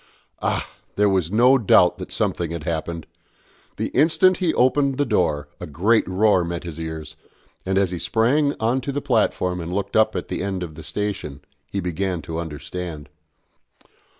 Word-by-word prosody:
Ah! - - -1 0.3
there 105 0 +3
was 95 -4 +1
no 125 +5 +5
doubt 90 -5 +4
that - - -7
something 85 -2 -1
had 85 -2 -5
happened! 85 0 -3 0.7
The - - -2
instant 170 +6 +4
he 180 -4 +1
opened 135 +1 +2
the 145 - +2
door 75 - 0
a 90 - -6
great 100 +10 +2
roar 95 0 +3
met 85 0 -4
his 85 -2 -7
ears, 80 -1 -6 0.5
and 95 0 +1
as 95 -2 +2
he 90 - -4
sprang 140 - +2
on 120 +4 +1
to 140 - -3
the 140 - -2
platform 90 -8 0
and 85 +1 -5
looked 100 +2 -3
up 110 0 +4
at - - -3
the - - -3
end 95 -2 -2
of 80 -3 -7
the 80 - -10
station, 80 -6 -4 0.3
he 100 - -2
began 90 -1 -2
to 80 +2 -4
understand. 80 0 -6
95 Hz, 180 wpm, -22 LUFS, 85-115 Hz, 0.7 s, no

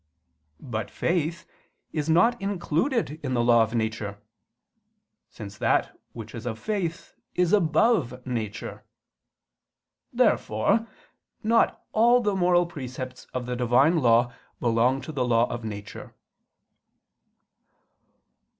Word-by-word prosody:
But 110 -5 -4
faith 170 -1 -1 0.5
is 155 -1 -2
not 190 +9 +3
included 195 - -1
in 130 -2 -1
the 120 - +2
law 120 -1 +5
of 110 +1 0
nature; 110 -2 -2 1.1
since 100 -2 -10
that - - +1 0.2
which 115 -2 -9
is 115 +1 -6
of 110 -2 -3
faith 185 - -3 0.2
is 180 0 +2
above 160 - +2
nature. 110 -5 -5 1.3
Therefore 200 - +2 0.6
not 230 +2 +2
all 240 +3 +5
the 210 -4 0
moral 175 -1 +3
precepts 130 -5 -7
of 125 -1 -4
the 125 0 -3
Divine 125 +7 +3
law 120 -1 +3 0.3
belong 120 +3 +2
to 135 - -7
the 135 -4 -1
law 120 -1 +3
of 120 -1 -5
nature. 105 -2 -8
130 Hz, 115 wpm, -26 LUFS, 115-175 Hz, 1.3 s, law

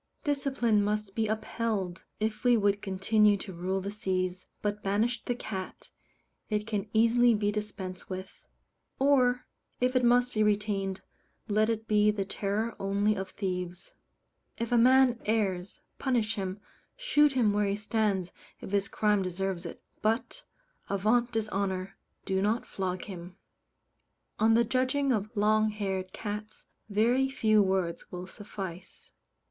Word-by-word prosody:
Discipline 265 -7 +1
must 210 -1 -1
be 220 0 0
upheld, 215 -4 -2
if 215 0 -2
we 245 -1 +5
would 200 -1 +2
continue 205 +2 +3
to 190 -1 -7
rule 185 +3 -2
the 200 +2 -4
seas; 185 -3 -2 0.2
but 210 0 -1
banish 220 +5 0
the 245 - -1
cat, 190 -6 -6 0.6
it 210 -1 0
can 210 -2 -3
easily 230 +1 +4
be 205 0 +1
dispensed 205 -3 -5
with; 185 0 -7 0.5
or, 255 -3 +3 0.3
if 250 +1 +1
it 255 - +3
must 245 +1 +4
be 215 - +1
retained, 205 -2 0 0.5
let 215 +1 +2
it 225 -1 -2
be 210 0 +4
the 205 -2 0
terror 205 +4 -2
only 200 +2 +1
of 190 -1 -4
thieves. 180 -2 -4 0.6
If 230 0 -3
a - - +4
man 255 0 +5
errs, 195 -4 -1 0.2
punish 235 -5 +1
him, 195 -2 -4 0.4
shoot 295 - +3
him 230 -5 +3
where 205 0 +2
he 200 - 0
stands 210 -4 0 0.3
if - - -8
his 200 -1 +1
crime 210 -2 +2
deserves 185 -1 -3
it, - - -10 0.2
but, 230 - -1 0.4
Avaunt 220 +5 +2
dishonour! 195 -4 -2 0.3
do 190 -1 0
not 215 +4 +1
flog 185 -2 -3
him. 180 -2 -9 1.0
On 225 +1 +5
the 235 - +5
judging 260 +3 +1
of 215 -3 0
long 215 +1 +3
haired 190 -3 -3
cats 210 +1 -6 0.2
very 240 +6 +3
few 215 -5 +3
words 190 -3 -1
will 180 0 -5
suffice. 190 -2 -9
210 Hz, 145 wpm, -29 LUFS, 195-230 Hz, 1.0 s, we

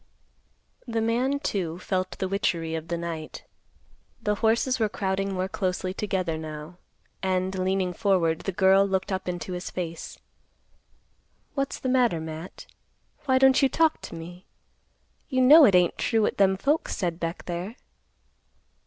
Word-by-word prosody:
The 230 -1 -1
man, 240 +5 +1
too, 175 - -2
felt 185 0 -2
the 190 - -2
witchery 170 -4 -1
of 160 0 -4
the 170 +1 -2
night. 165 -2 -6 0.8
The 210 - +1
horses 230 +4 +1
were 220 -2 +2
crowding 195 -1 -2
more 185 0 -1
closely 185 -1 -2
together 185 -5 -2
now, 155 +2 -8 0.4
and, 185 0 0
leaning 185 -1 0
forward, 175 -5 +1
the 195 - -3
girl 190 +1 +5
looked 195 0 -1
up 185 -1 -2
into 180 +1 -4
his 180 +1 -5
face; 170 -2 -6 1.4
"What's 275 -1 -2
the - - -4
matter, 250 -9 +2
Matt? 160 +2 -8 0.6
Why 260 -2 +3
don't 265 0 +5
you 270 - +4
talk 320 +1 +2
to - - -8
me? 175 +2 -10 0.8
You 260 -2 +1
know 295 +4 +9
it 195 - +5
ain't 180 -1 +3
true 225 -2 +2
what - - 0
them 190 -1 +4
folks 290 +9 0
said 170 -2 -2
back 165 0 -4
there." 180 +6 -4
190 Hz, 155 wpm, -26 LUFS, 175-225 Hz, 1.4 s, know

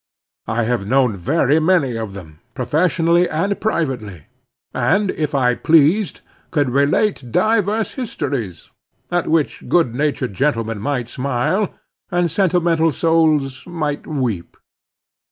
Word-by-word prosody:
I 115 +2 0
have 115 -3 -1
known 125 -2 +2
very 145 - +2
many 155 -7 +2
of 110 -3 -5
them, 80 -6 -11 0.2
professionally 165 +6 +2
and 195 +6 -1
privately, 125 - -2 0.5
and 195 +2 +1
if 150 -2 -3
I 125 -2 +3
pleased, 165 - +3 0.3
could 145 -6 0
relate 140 - +1
divers 215 - +1
histories, 140 - -4 0.4
at 175 -1 0
which 160 -2 -1
good 165 -10 +2
natured 135 -4 -1
gentlemen 115 -3 -1
might 125 +1 -2
smile, 140 - -1 0.4
and 175 -2 0
sentimental 170 -3 +2
souls 155 -4 +1
might 155 -4 -3
weep. 125 - -3
145 Hz, 120 wpm, -19 LUFS, 125-170 Hz, 0.5 s, I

